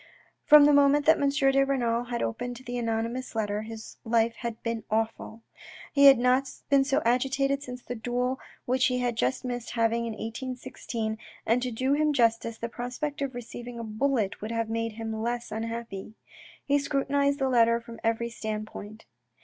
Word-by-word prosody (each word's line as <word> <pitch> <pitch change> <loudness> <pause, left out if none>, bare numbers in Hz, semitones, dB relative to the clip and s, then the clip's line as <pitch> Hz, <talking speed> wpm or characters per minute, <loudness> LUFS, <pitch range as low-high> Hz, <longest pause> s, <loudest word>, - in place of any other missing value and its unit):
From 300 -1 +9
the 295 - +5
moment 285 +1 +5
that 320 -1 +5
M. 280 - +3
de 275 -1 +3
Renal 240 -3 0
had 240 -1 -2
opened 245 +2 -3
the 245 - -5
anony 225 -1 0
mous 255 -1 -6
letter 210 -1 -1
his 220 0 -9
life 230 0 +2
had 235 -2 -5
been 230 -1 -2
awful. 225 +1 -2 0.5
He 280 -1 +5
had 270 -2 +9
not 255 +2 +2 0.2
been 275 -1 +6
so 275 +1 +1
agitated 270 +3 +1
since 250 -2 -8
a 245 - -3
duel 245 +2 -2 0.3
which 255 +1 +2
he 250 - 0
had 245 -1 0
just 130 - -1
missed 245 -1 -4
having 230 0 +1
in 225 - -3
1816, 225 -1 -5 0.3
and 235 +3 +2
to 255 - -1
do 255 +4 0
him 300 +1 +2
justice, 230 -2 +1
the 230 - -4
prospect 250 +5 -4
of 270 -3 -2
receiving 240 0 -7
a 230 - -5
bullet 220 -1 -1
would 215 - -4
have 230 -1 -1
made 230 0 -2
him 225 0 -5
less 240 +1 -3
unhappy. 225 -2 -5 0.5
He 285 0 +3
scrutinised 280 0 +1
the 270 -2 0
letter 235 -2 +4
from 230 -1 -11
every 230 +1 0
standpoint. 215 -1 -6
240 Hz, 180 wpm, -28 LUFS, 225-270 Hz, 0.5 s, From